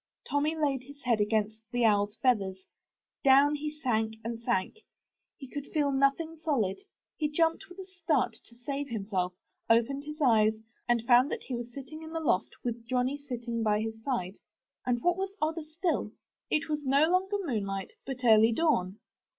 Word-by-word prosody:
Tommy 295 +3 +1
laid 285 -4 0
his 280 +2 -14
head 235 -4 +2
against 215 +1 0
the 245 - -1
OwFs 205 -1 +3
feathers. 195 -7 +1 0.6
Down 275 +2 +6
he 300 +1 -2
sank 230 -8 -1
and 230 0 -4
sank. 235 - -1 0.6
He 270 - -9
could 285 +2 -6
feel 290 -2 +1
nothing 275 +4 +1
solid, 270 - 0 0.2
— - - -64
he 300 -1 +1
jumped 330 +5 +1
with 360 - -13
a 380 - -7
start 320 -10 0
to 235 - -19
save 275 +3 -4
himself, 195 -5 -2 0.3
opened 235 +5 +2
his 300 +1 -7
eyes, 220 -6 +4 0.4
and 235 -1 +2
found 245 +3 +6
that - - -3
he 260 - -6
was 240 0 -4
sitting 280 +4 -9
in 320 0 -9
the 325 - -1
loft 245 -11 0
with 235 -1 -4
Johnny 255 +2 +1
sleeping 240 -4 -4
by 210 -1 +2
his 220 0 -4
side. 215 -7 -2 0.5
And 240 -1 0
what 350 0 +3
was 390 +1 -4
odder 320 +2 0
still, 320 +3 -2 0.4
it 300 -2 +1
was 300 -1 -2
no 280 +3 +4
longer 380 +3 +2
moonlight, 200 - -3
but 260 -2 -6
early 225 0 +7
dawn. 220 - +1
255 Hz, 180 wpm, -30 LUFS, 225-300 Hz, 0.6 s, early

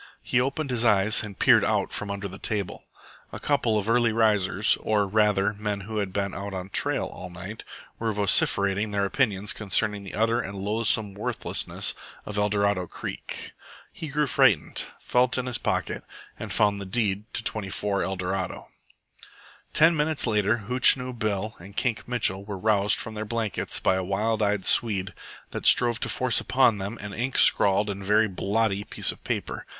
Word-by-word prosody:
He 120 - +1
opened 140 +2 -2
his 120 -2 0
eyes 105 -2 +4
and 105 -3 -8
peered - - +5
out - - 0
from 105 - -4
under 100 0 -4
the 95 +1 -10
table. 105 -5 -3 0.5
A - - -6
couple 120 -7 +1
of 105 0 -2
early 120 0 +3
risers, 105 -2 +3
or, 105 -2 0
rather, 105 0 +2
men 105 -1 -4
who 110 +3 -6
had 100 -2 -3
been 100 0 -2
out 100 0 -6
on 95 0 -6
trail - - 0
all 90 - -9
night, 95 +5 -9 0.4
were 115 -1 -1
vociferating 100 0 +2
their 100 -1 0
opinions 105 -3 -1
concerning 105 0 -1
the 95 - -8
utter 115 +2 +1
and 100 0 -7
loathsome 105 0 0
worthlessness 100 - -2 0.3
of 105 -1 -4
Eldorado 100 -3 +1
Creek. - - -7 0.4
He 160 - -6
grew 150 +1 0
frightened, 130 - +2
felt 125 +1 +1
in 130 - -2
his 125 -2 -3
pocket, - - -2 0.4
and - - -6
found 105 -1 +1
the - - -6
deed 105 0 -1
to 110 - +1
24 100 -2 0
ELDORADO. 95 0 -3 1.0
Ten 160 +2 +5
minutes 150 0 0
later 110 0 +1
Hootchinoo 125 +1 +4
Bill 110 -2 -2
and 100 +4 -13
Kink 120 -4 -1
Mitchell 105 -5 +1
were 100 -1 -6
roused 105 0 +2
from 110 - -3
their 105 0 -4
blankets 110 -1 -2
by 95 - +2
a 95 - -2
wild 105 +4 -1
eyed 105 -2 0
Swede 100 -5 +1 0.4
that - - -3
strove 120 -1 +4
to - - -2
force 130 -3 +2
upon 125 -5 +2
them 100 +4 -5
an 105 -1 -7
ink 125 +5 -2
scrawled 100 +1 +5
and 100 -1 -5
very 105 +3 +3
blotty 100 +1 -1
piece - - +2
of - - -14
paper. - - -4
105 Hz, 175 wpm, -25 LUFS, 100-115 Hz, 1.0 s, peered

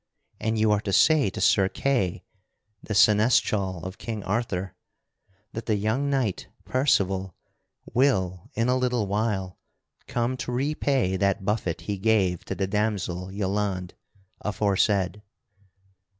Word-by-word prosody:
And 110 +1 -1
you 110 0 +3
are 105 -1 +2
to 100 - -3
say 155 -5 +5
to - - -7
Sir 95 -2 +4
Kay, 95 -11 -1 0.6
the 105 - -4
Seneschal 105 -4 +3
of 95 +1 -7
King 110 -3 -5
Arthur, 95 -3 -2 0.8
that 115 - -6
the 110 - +2
young 110 +8 0
knight 130 -9 -1 0.2
Percival 95 - +1 0.6
will 95 -9 +1
in 115 +2 +1
a 125 - +3
little 125 -4 0
while 100 -2 -2 0.5
come 120 +2 -1
to 125 - -4
repay 135 -6 0
that 100 +1 0
buffet 95 -6 -1
he 100 +3 -4
gave 95 -4 +2
to - - -4
the 95 - -1
damoiselle 95 -3 -2
Yelande 100 -2 -2 0.5
aforesaid." 100 -1 +1
105 Hz, 130 wpm, -26 LUFS, 95-115 Hz, 0.8 s, say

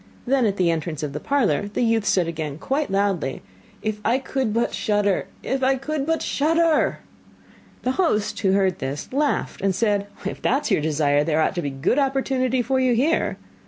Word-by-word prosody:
Then 260 -2 +2
at 200 -1 -1
the 175 -2 +3
entrance 160 -2 -3
of 145 -2 -3
the 150 - -3
parlour 210 - +1
the - - +1
youth 225 -3 +2
again 165 -4 -1
said 145 - -11
quite 285 - -1
loudly: 195 -8 -1 0.4
'If 215 -1 -2
I 235 +3 +2
could 265 -3 -2
but 230 +2 0
shudder! 205 -4 0 0.2
If 265 0 -1
I 265 +1 +3
could 280 +2 -3
but 325 0 0
shudder!' 325 +2 +2 0.8
The 255 - +1
host 260 - 0
who 190 -1 +2
heard 190 -2 +2
this, 135 - -5
laughed 290 +1 0
and 195 -1 +1
said: 205 -1 +1 0.2
'If - - -4
that 275 +4 +1
is 270 - -3
your 195 - +3
desire, 145 -1 +2
there 155 0 +1
ought 155 - +2
to 175 - -2
be 145 - -3
a - - -7
good 135 - +1
opportunity 265 -2 +1
for 260 +3 +1
you 255 -2 +3
here. 295 +8 +1
215 Hz, 200 wpm, -23 LUFS, 175-265 Hz, 0.8 s, the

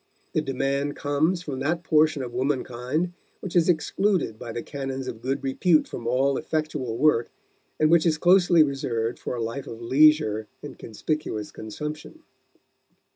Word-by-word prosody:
The 155 - +2
demand 140 +1 -1
comes 155 +5 0
from 140 -6 -5
that 165 +4 -1
portion 155 -3 +3
of 120 -1 -7
womankind 130 +5 -1 0.3
which 185 - -7
is 175 0 +4
excluded 175 - +1
by 115 - -6
the 115 - -5
canons 135 -2 -5
of 115 -3 -6
good 135 +3 -2
repute 155 +4 +2
from 115 - -6
all 130 +3 +2
effectual 155 -7 -3
work, 130 -4 +3 0.5
and 155 0 +3
which 170 0 +5
is 155 -2 +2
closely 175 -1 +5
reserved 120 -5 -2
for - - -4
a 115 - -2
life 115 +5 -5
of 115 - -8
leisure 120 -4 +3 0.2
and - - -9
conspicuous 110 -2 -4
consumption. 150 - -7
140 Hz, 155 wpm, -25 LUFS, 125-155 Hz, 0.5 s, which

